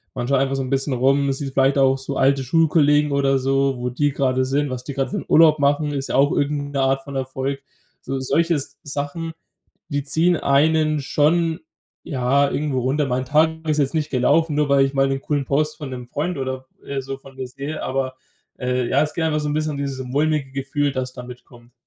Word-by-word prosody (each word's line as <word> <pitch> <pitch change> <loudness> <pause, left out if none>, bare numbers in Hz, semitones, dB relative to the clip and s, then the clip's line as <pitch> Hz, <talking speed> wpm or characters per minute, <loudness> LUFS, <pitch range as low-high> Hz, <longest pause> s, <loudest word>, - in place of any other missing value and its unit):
man 120 -1 -3
schaut 140 -1 +3
einfach 135 0 0
so 135 - -1
'n 130 - -4
bisschen 135 0 0
rum. 135 +2 +2
Sieht 135 0 -5
vielleicht 135 +1 +3
auch 135 0 +4
so 135 +1 -5
alte 135 0 +3
Schulkollegen 150 0 +3
oder 135 -1 +2
so, 135 0 +1
wo 125 0 -2
die 145 +3 0
grade 130 -1 +1
sind, 140 +2 0
was 125 -1 -5
die 140 - -6
grad 135 -1 -1
für - - -3
'n - - -5
Urlaub 155 -1 +6
machen 145 +1 +1
ist 135 -1 -3
ja - - -1
auch 140 +2 +4
irgend 145 0 -1
'ne 135 - 0
Art 135 0 +1
von 140 -1 -9
Erfolg. 135 +1 -3 0.4
So 135 0 -4
solche 165 +6 +1
S 145 -1 -4
Sachen, 145 +3 -4 0.6
die 145 0 -1
ziehen 165 +4 +2
einen 155 +2 +2
schon, 160 +4 +1 0.4
ja, 140 0 +1
irgendwo 145 -3 -1
runter. 140 +4 0
Mein 130 0 -1
Tag 160 +2 +1
ist 155 - +2
jetzt 140 -2 +1
nicht 155 -1 0
gelaufen, 150 +4 +2
nur 150 -2 +1
weil 135 -1 +5
ich 135 - -6
mal 135 0 +2
'n 135 0 -1
coolen 145 -1 -1
Post 150 +3 0
von 145 -4 -7
'nem 125 -1 -7
Freund 155 +3 -3
oder, 130 0 -4 0.2
äh, 135 -1 -3
so 135 +1 -6
vor 135 0 -15
mir 130 -1 -5
sehe. 140 +4 -6
Aber, 130 0 -2 0.4
äh, 125 -1 -1
ja, 140 +3 +3
ist 150 - -2
gerne 160 -2 0
mal 150 - 0
so 150 - -2
'n - - -1
bisschen 155 -1 -1
dieses 135 -2 -3
mulmige 145 0 0
Gefühl, 140 +1 -1
dass 130 -1 -4
da 125 - -8
mitkommt. 120 -1 -13
140 Hz, 225 wpm, -21 LUFS, 130-150 Hz, 0.6 s, Urlaub